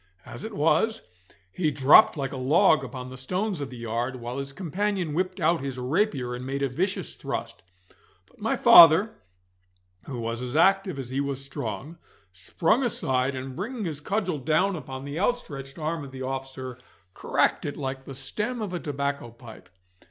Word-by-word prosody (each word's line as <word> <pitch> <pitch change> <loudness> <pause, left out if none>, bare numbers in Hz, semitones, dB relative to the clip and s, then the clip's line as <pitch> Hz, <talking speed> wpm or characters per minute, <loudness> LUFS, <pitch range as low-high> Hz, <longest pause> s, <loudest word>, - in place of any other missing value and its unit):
As - - -9
it 220 0 -6
was, 165 +9 +2 0.5
he 160 - 0
dropped 140 +2 +6
like 135 -1 -3
a - - -4
log 135 +2 +4
upon 130 -1 -7
the 130 - -9
stones 185 +6 -2
of 140 - -4
the 125 - -9
yard, 120 +2 -3
while 120 +2 -5
his 140 0 -5
companion 185 +1 -2
whipped 185 +3 -1
out 165 -1 +2
his 135 -2 -4
rapier 130 - 0
and 125 +1 -6
made 135 +2 -3
a 135 - +1
vicious 180 +10 -2
thrust; - - -5 0.6
but - - -27
my - - +1
father, 170 +6 +8 1.0
who 130 -4 -5
was 115 +1 -3
as 125 +2 -5
active 195 0 +3
as 130 -2 -6
he 135 +2 0
was 140 -1 -4
strong, 135 - -6 0.3
sprung 165 - +1
aside, 135 - 0
and 130 0 -6
bringing 220 +4 -4
his 150 -4 -4
cudgel 185 -2 -1
down 180 +8 +1
upon 135 -4 -7
the 145 +3 -4
outstretched 145 - -2
arm 160 0 -3
of 135 - -9
the 130 0 -7
officer, 130 -1 -5 0.3
cracked - - +1
it 145 - -4
like 135 -1 -4
the 135 - -8
stem 210 - -3
of 205 -4 -4
a 175 - -2
tobacco 140 -4 -3
pipe. 115 -1 -14
140 Hz, 180 wpm, -26 LUFS, 130-180 Hz, 1.0 s, father